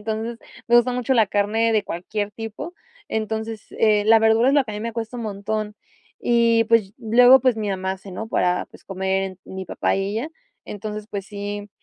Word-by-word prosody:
Entonces, 220 Hz, +2 st, -4 dB, 0.3 s
me 240 Hz, -, +5 dB
gusta 245 Hz, +1 st, +3 dB
mucho 250 Hz, +1 st, 0 dB
la 225 Hz, -4 st, +4 dB
carne 215 Hz, +3 st, +1 dB
de 215 Hz, -, +3 dB
cualquier 205 Hz, +4 st, -4 dB
tipo. 225 Hz, +10 st, -7 dB, 0.3 s
Entonces, 220 Hz, 0 st, -3 dB, 0.2 s
eh, 210 Hz, -2 st, +4 dB
la 225 Hz, 0 st, +7 dB
verdura 225 Hz, +2 st, +4 dB
es 275 Hz, -, +3 dB
lo 285 Hz, -2 st, +4 dB
que 225 Hz, -, -7 dB
a -, -, -6 dB
mí 210 Hz, -, -5 dB
me 230 Hz, 0 st, -4 dB
cuesta 230 Hz, +1 st, -4 dB
un 235 Hz, -, -4 dB
montón 210 Hz, +1 st, -3 dB, 0.4 s
y, 230 Hz, -1 st, +3 dB
pues, 220 Hz, -3 st, +2 dB
ll 225 Hz, -2 st, -4 dB
luego, 250 Hz, +2 st, +8 dB
pues, 255 Hz, -1 st, +3 dB
mi 210 Hz, -1 st, -2 dB
mamá 190 Hz, -1 st, -2 dB
hace, 190 Hz, 0 st, -10 dB
¿no?, 220 Hz, +5 st, -6 dB
para, 180 Hz, -4 st, +1 dB
pues, -, -, -17 dB
comer 190 Hz, 0 st, -2 dB
mi 190 Hz, 0 st, -7 dB
papá -, -, 0 dB
y 195 Hz, 0 st, -1 dB
ella. 290 Hz, +8 st, -4 dB, 0.4 s
Entonces, 210 Hz, 0 st, -6 dB
pues, 200 Hz, -2 st, -4 dB
sí, 205 Hz, 0 st, -6 dB
220 Hz, 210 wpm, -22 LUFS, 205-230 Hz, 0.4 s, luego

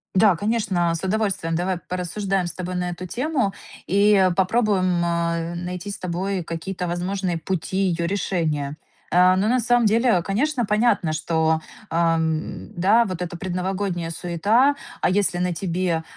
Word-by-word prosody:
Да, 195 Hz, -1 st, +5 dB
конечно, 200 Hz, -3 st, 0 dB
а, 165 Hz, -, -1 dB
с 165 Hz, -, -6 dB
удовольствием. 195 Hz, -4 st, 0 dB
Давай 180 Hz, +2 st, 0 dB
порассуждаем 185 Hz, +2 st, -2 dB
с -, -, -6 dB
тобой 180 Hz, 0 st, -5 dB
на 180 Hz, 0 st, -1 dB
эту 175 Hz, +1 st, -6 dB
тему 250 Hz, -, -1 dB, 0.3 s
и, 200 Hz, +3 st, +4 dB
э, 190 Hz, -2 st, +4 dB
попробуем, 185 Hz, -2 st, +2 dB
а, 170 Hz, 0 st, -1 dB
найти 180 Hz, +3 st, -5 dB
с -, -, -6 dB
тобой 185 Hz, +1 st, -2 dB
какие-то 180 Hz, +2 st, -4 dB
возможные 180 Hz, 0 st, -2 dB
пути 185 Hz, +2 st, -3 dB
ее 170 Hz, -3 st, +1 dB
решения. 155 Hz, -7 st, -1 dB, 0.3 s
А, 180 Hz, +1 st, +5 dB
но, 200 Hz, -, +1 dB
на 250 Hz, +2 st, +2 dB
самом 245 Hz, 0 st, +3 dB
деле, 225 Hz, -2 st, +3 dB
конечно, 240 Hz, -, 0 dB
понятно, 210 Hz, -6 st, +2 dB
что, 160 Hz, 0 st, +1 dB, 0.3 s
ам, 160 Hz, -1 st, 0 dB
да, 205 Hz, +7 st, +4 dB
вот 185 Hz, -4 st, -5 dB
эта 175 Hz, -1 st, -4 dB
предновогодняя 185 Hz, -1 st, -2 dB
суета, 205 Hz, -, +2 dB, 0.2 s
а -, -, +2 dB
если 190 Hz, -1 st, +1 dB
на 180 Hz, 0 st, 0 dB
тебе, 170 Hz, -1 st, -1 dB
185 Hz, 155 wpm, -23 LUFS, 170-200 Hz, 0.3 s, Да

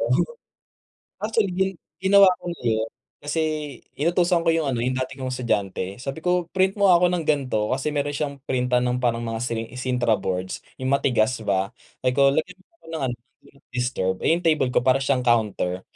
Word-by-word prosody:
oh. 115 Hz, +2 st, +1 dB, 1.1 s
Actually, 215 Hz, -2 st, 0 dB
gi 190 Hz, +1 st, +2 dB, 0.3 s
ginawa 195 Hz, +1 st, +7 dB
ko -, -, -9 dB
na 170 Hz, -, -8 dB
yun 110 Hz, -1 st, 0 dB, 0.4 s
kasi 160 Hz, +2 st, 0 dB, 0.6 s
inutusan 170 Hz, +2 st, +2 dB
ko 165 Hz, -, +4 dB
yung 160 Hz, -3 st, 0 dB
ano, 125 Hz, -, -1 dB
yung 130 Hz, -, 0 dB
dati 130 Hz, +1 st, -3 dB
kong 130 Hz, -1 st, -3 dB
estudyante, 100 Hz, -6 st, -2 dB
sabi 135 Hz, +5 st, -6 dB
ko, 180 Hz, 0 st, +1 dB
"Print 190 Hz, +2 st, +2 dB
mo 200 Hz, -2 st, +5 dB
ako 175 Hz, +1 st, +5 dB
ng 175 Hz, -3 st, -1 dB
ganito," 130 Hz, -8 st, +1 dB
kasi 135 Hz, +3 st, -1 dB
meron 145 Hz, -1 st, -1 dB
siyang 140 Hz, -1 st, -3 dB
printan 125 Hz, -1 st, +1 dB
ng 125 Hz, 0 st, 0 dB
parang 120 Hz, -1 st, 0 dB
mga 115 Hz, 0 st, -3 dB
siling 115 Hz, -1 st, -3 dB
sintra 125 Hz, -3 st, +1 dB
boards, 95 Hz, -2 st, -3 dB, 0.2 s
yung 130 Hz, +1 st, -1 dB
matigas 125 Hz, -3 st, +2 dB
ba 100 Hz, +1 st, 0 dB, 0.3 s
sabi 125 Hz, -, +3 dB
ko, 140 Hz, 0 st, +5 dB
"Lagyan 180 Hz, +6 st, -2 dB
mo -, -, -36 dB
nga -, -, -25 dB
ng 160 Hz, -4 st, -3 dB
ano 120 Hz, -, -3 dB
do 125 Hz, -, -26 dB
not 140 Hz, -, -28 dB
disturb," 120 Hz, -7 st, 0 dB
eh -, -, +2 dB
yung 170 Hz, +1 st, +1 dB
table 155 Hz, -5 st, +3 dB
ko 125 Hz, 0 st, +1 dB
para 130 Hz, +1 st, +4 dB
siyang 130 Hz, -2 st, +1 dB
counter. 105 Hz, -6 st, +1 dB
130 Hz, 200 wpm, -24 LUFS, 120-160 Hz, 1.1 s, ginawa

